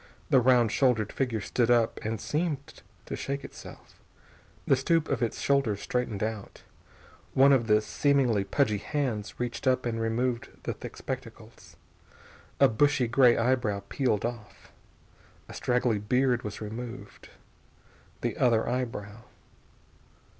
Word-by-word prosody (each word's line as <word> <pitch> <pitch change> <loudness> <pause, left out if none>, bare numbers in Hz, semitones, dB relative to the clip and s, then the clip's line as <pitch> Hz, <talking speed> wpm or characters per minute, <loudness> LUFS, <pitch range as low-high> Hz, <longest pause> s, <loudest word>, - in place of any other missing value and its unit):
The 130 - +6
round 120 -3 +4
shouldered 115 -4 +1
figure 120 -5 -1
stood 120 +3 0
up 120 -2 +3
and 110 -1 -3
seemed 145 +3 -3 0.2
to - - -5
shake 140 0 -4
itself. - - -12 0.6
The - - +4
stoop 160 +4 +1
of 130 -4 -1
its 115 - -1
shoulders 135 -8 +1
straightened 115 -5 -2
out. 110 -2 -5 0.7
One 140 +1 +6
of 120 -4 +2
the 105 -1 +4
seemingly 125 -4 +1
pudgy 105 +1 +1
hands 120 -5 -3
reached 120 +1 -3
up 130 -1 +2
and 115 -1 -2
removed 120 +2 -1
the - - -2
thick - - -10
spectacles. - - -8 0.8
A - - +7
bushy 130 +2 +2
gray 120 0 +5
eyebrow 115 -4 0
peeled 125 -6 0
off. 120 -3 -7 0.8
A - - -10
straggly 125 -3 0
beard 125 +3 +1
was 105 -2 -7
removed. 115 0 -8 0.9
The - - -2
other 115 -3 +2
eyebrow.... 115 -3 -4
120 Hz, 130 wpm, -28 LUFS, 110-130 Hz, 0.9 s, A